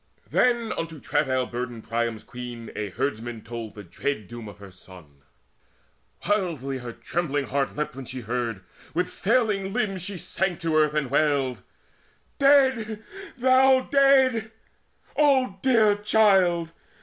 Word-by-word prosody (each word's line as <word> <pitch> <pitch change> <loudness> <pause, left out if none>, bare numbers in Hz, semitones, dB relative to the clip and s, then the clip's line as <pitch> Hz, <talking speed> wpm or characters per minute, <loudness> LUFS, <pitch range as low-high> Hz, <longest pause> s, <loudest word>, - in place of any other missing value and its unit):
Then 240 -3 +2
unto 165 -2 -4
travail 130 -3 0
burdened 120 -2 -6
Priam's 115 -1 -2
queen 120 -2 -8
A 105 -1 -3
herdman 115 +2 -3
told 115 -2 -7
the 105 - -9
dread 110 +4 -4
doom 120 0 -8
of 105 - -11
her 100 -1 -12
son. 90 -6 -15 1.1
Wildly 165 -10 -1
her 120 -1 -7
trembling 145 +1 -2
heart 140 0 -1
leapt 150 -3 -3
when 135 -1 -7
she 130 +1 -6
heard; 115 -4 -3 0.3
With 180 +1 0
failing 205 -3 0
limbs 205 -6 -1
she 195 +2 -4
sank 180 +1 -2
to 165 -2 0
earth 155 -1 +3
and 140 -4 -1
wailed: 140 -4 +1 0.8
"Dead! 260 -6 +3 0.3
thou 260 +1 +5
dead, 265 -5 +3 0.7
O 260 -9 +3
dear 225 -5 +4
child! 195 -6 +3
155 Hz, 135 wpm, -25 LUFS, -, 1.1 s, thou